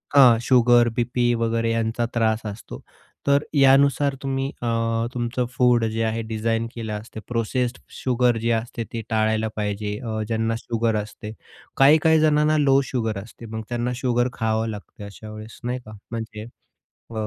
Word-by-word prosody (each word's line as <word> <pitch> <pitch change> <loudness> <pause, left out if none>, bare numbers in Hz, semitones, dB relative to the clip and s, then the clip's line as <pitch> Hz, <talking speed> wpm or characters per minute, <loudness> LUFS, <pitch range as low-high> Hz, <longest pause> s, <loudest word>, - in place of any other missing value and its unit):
हां, 125 -5 +8
sugar, 120 -1 +5
BP 120 0 +1
वगैरे 115 0 0
यांचा 115 +1 0
त्रास 110 -2 +1
असतो. 105 +1 -7 0.5
तर 140 +1 +4
यानुसार 140 0 +4
तुम्ही 135 0 -1
अ, 120 - -2 0.5
तुमचं 120 0 -1
फूड 125 -2 +4
जे 110 +1 -1
आहे 110 +1 -1
डिझाईन 115 +1 0
केलं 110 -2 -4
असतं. 110 +1 -7
प्रोसेस्ड 120 +2 -1 0.2
शुगर 125 -2 +1
जे 115 - 0
असते 115 +1 -2
ती 115 - -3
टाळायला 110 0 +1
पाहिजे 105 0 -3
अ, 110 -3 -3
ज्यांना 115 0 0
शुगर 115 -1 -1
असते. 105 +1 -9 0.5
काही-काही 155 +3 +6
जणांना 155 0 +3
लो 135 -2 +4
शुगर 115 -5 -2
असते, 115 +1 -13
मग 110 0 -5
त्यांना 120 +1 -1
शुगर 120 -1 +1
खावं 110 0 0
लागते 105 -1 -9
अशावेळेस, 110 +2 -10
नाही 125 +1 -2
का? 110 - -11 0.2
म्हणजे 110 -1 -6 0.7
अ, - - -9
115 Hz, 155 wpm, -23 LUFS, 110-125 Hz, 0.7 s, हां